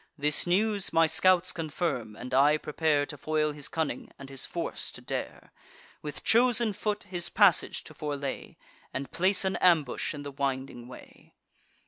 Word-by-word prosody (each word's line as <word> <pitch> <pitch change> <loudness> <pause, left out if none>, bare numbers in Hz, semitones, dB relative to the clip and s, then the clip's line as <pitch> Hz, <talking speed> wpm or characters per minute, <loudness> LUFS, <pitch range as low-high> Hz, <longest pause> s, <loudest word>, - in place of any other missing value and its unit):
This 150 +3 +2
news 200 +2 +1
my 165 0 +5
scouts 185 +2 +4
confirm, 150 - -3
and 125 +3 -8
I 145 +3 +5
prepare 150 -1 0
To 145 -1 -9
foil 155 +1 0
his 145 -1 -4
cunning, 160 -3 -3
and 135 -1 -11
his 135 - -4
force - - -4
to - - -9
dare; - - -6 0.5
With 150 -1 -7
chosen 235 -2 +4
foot 210 +1 -2
his 180 -3 -4
passage 200 -6 +3
to 155 - -11
forelay, 145 -3 -5 0.4
And 135 +1 -4
place 190 +2 +2
an 190 - 0
ambush 160 -6 +2
in 145 - -7
the 145 - -6
winding 135 -3 -3
way. 125 - -15
155 Hz, 160 wpm, -28 LUFS, 140-185 Hz, 0.5 s, my